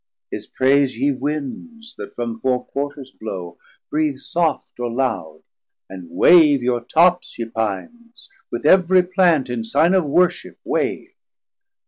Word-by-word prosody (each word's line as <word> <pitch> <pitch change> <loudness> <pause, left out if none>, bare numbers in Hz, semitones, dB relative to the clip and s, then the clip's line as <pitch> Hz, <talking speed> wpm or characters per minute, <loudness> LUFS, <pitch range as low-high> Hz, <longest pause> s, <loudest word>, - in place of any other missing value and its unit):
His - - -6
praise 135 -1 +2
ye 140 +4 +1
Winds, 150 - -5
that - - -9
from 115 -2 -4
four 125 +1 -1
Quarters 140 -1 -5
blow, 90 -5 -7 0.3
Breath 150 -3 0
soft 165 -6 -2
or 120 -1 -2
loud; 110 -11 -3 0.4
and 90 -3 -10
wave 150 - +5
your 120 -1 0
tops, 175 +7 +2
ye 115 - -3
Pines, 115 - -5 0.2
With - - -5
every 185 0 +5
Plant, 180 -5 +2
in 120 -2 -3
sign 145 +10 +2
of 185 -4 +2
Worship 175 +4 0
wave. - - -2
140 Hz, 135 wpm, -20 LUFS, 120-175 Hz, 0.4 s, wave